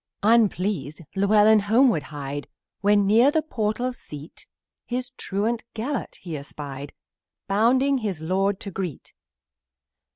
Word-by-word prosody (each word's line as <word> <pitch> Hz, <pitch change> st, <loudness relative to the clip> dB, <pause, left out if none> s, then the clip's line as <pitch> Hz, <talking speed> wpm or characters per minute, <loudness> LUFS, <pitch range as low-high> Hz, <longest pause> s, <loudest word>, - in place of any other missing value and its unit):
Unpleased, 200 Hz, -, +2 dB
Llewellyn 210 Hz, +2 st, +5 dB
homeward 220 Hz, -, +3 dB
hied, 145 Hz, 0 st, -6 dB, 0.3 s
When 205 Hz, 0 st, +3 dB
near 225 Hz, +7 st, +5 dB
the 310 Hz, +1 st, +1 dB
portal 245 Hz, -2 st, -1 dB
seat, 150 Hz, -, -10 dB, 0.4 s
His 250 Hz, 0 st, -4 dB
truant 220 Hz, +4 st, -2 dB
Gelert 245 Hz, +4 st, -3 dB
he 170 Hz, -4 st, -5 dB
espied, 140 Hz, -1 st, -7 dB, 0.5 s
Bounding 255 Hz, +7 st, +3 dB
his 200 Hz, -8 st, -3 dB
lord 190 Hz, +4 st, 0 dB
to 200 Hz, -, -7 dB
meet. 175 Hz, -7 st, -5 dB
205 Hz, 110 wpm, -24 LUFS, 165-235 Hz, 0.5 s, Llewellyn